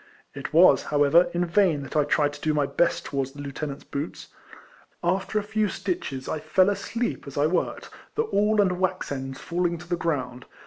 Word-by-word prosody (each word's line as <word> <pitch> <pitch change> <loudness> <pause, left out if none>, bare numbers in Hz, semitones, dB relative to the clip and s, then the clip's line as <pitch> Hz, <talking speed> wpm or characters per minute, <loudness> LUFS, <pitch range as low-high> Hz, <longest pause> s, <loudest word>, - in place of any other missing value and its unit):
It - - -6
was, - - +6
however, 150 +4 +4
in 175 +1 0
vain 170 -5 +2
that 140 - -9
I 150 -1 +3
tried 145 0 +2
to 145 - -11
do 155 -1 +1
my 145 -1 +2
best 140 +5 0
towards 135 -1 -3
the 145 - -9
lieutenant's 140 0 -5
boots. 140 +3 -6 0.7
After 190 +4 0
a 210 - +1
few 215 0 0
stitches, 140 -10 -4
I 155 - -2
fell 185 +6 +3
asleep 230 -2 -3
as 140 - -8
I 145 - +3
worked, 170 +4 -1 0.2
the 450 - +2
awl 215 - +1
and 180 -3 +2
wax 185 -3 -1
ends 135 -1 -5
falling 175 0 -1
to 175 +1 -12
the 175 - 0
ground. 130 -8 -3
165 Hz, 195 wpm, -25 LUFS, 145-185 Hz, 0.7 s, was